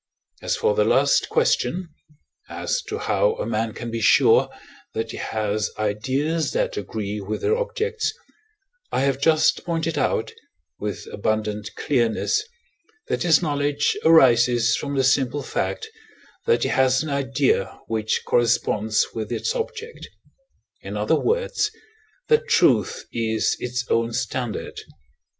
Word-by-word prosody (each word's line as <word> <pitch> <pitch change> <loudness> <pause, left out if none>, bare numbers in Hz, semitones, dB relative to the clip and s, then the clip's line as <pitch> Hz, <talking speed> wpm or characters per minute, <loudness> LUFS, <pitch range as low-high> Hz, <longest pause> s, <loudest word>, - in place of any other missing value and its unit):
As - - -1
for 460 +1 +2
the 470 - +2
last - - +3
question 185 - +1 0.6
as - - -2
to 425 +2 -3
how 450 +2 +1
a - - -4
man 115 0 -1
can 120 +1 -7
be 115 0 -3
sure - - +5 0.5
that 110 0 -2
he - - -7
has 110 -1 -2
ideas 130 +10 -1
that - - 0
agree 105 0 -4
with 105 +2 -4
their 440 - +2
objects, 465 -2 -2 0.8
I - - 0
have 135 0 0
just 155 +1 +3
pointed 165 -2 -2
out, - - 0 0.5
with 105 -1 -4
abundant 105 0 -2
clearness, 125 - +1 0.7
that - - -1
his 170 0 +4
knowledge 145 -1 0
arises 120 -7 +5
from 140 -1 -4
the 135 - +2
simple 135 +1 +1
fact, 445 - -3 0.6
that 465 - +3
he - - 0
has 130 +1 +3
an 155 - -5
idea 135 -5 0
which 110 -1 -1
corresponds 110 -2 +2
with 110 -2 -5
its 460 - -1
object 470 -1 -5 0.7
in - - -6
other - - +1
words, 485 -2 0 0.6
that 460 +1 +3
truth 460 -1 +2
is 110 -1 0
its 125 0 -3
own 115 0 0
standard. 120 -2 -3
135 Hz, 135 wpm, -23 LUFS, 110-175 Hz, 0.8 s, sure